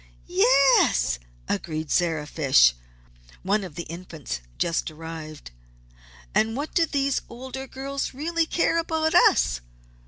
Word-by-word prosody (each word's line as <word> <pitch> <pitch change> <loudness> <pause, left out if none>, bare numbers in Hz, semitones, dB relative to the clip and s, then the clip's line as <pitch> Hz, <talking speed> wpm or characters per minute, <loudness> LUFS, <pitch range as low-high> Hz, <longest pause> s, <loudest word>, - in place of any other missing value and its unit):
"Yes!" 250 - +4 0.3
agreed 155 +7 -3
Sarah 165 -4 +1
Fish, 135 - +4 0.7
one 200 +2 +1
of 180 -6 -9
the 170 - -4
Infants 160 - -7 0.2
just 170 -1 0
arrived. 155 - -9 0.8
"And 225 +2 +1
what 290 +2 -4
do 335 -2 +3
these 275 -2 0
older 260 +2 -7
girls 275 +1 -4
really 325 +4 -1
care 335 0 +1
about 320 -1 0
us? - - +4
190 Hz, 120 wpm, -25 LUFS, -, 0.8 s, Yes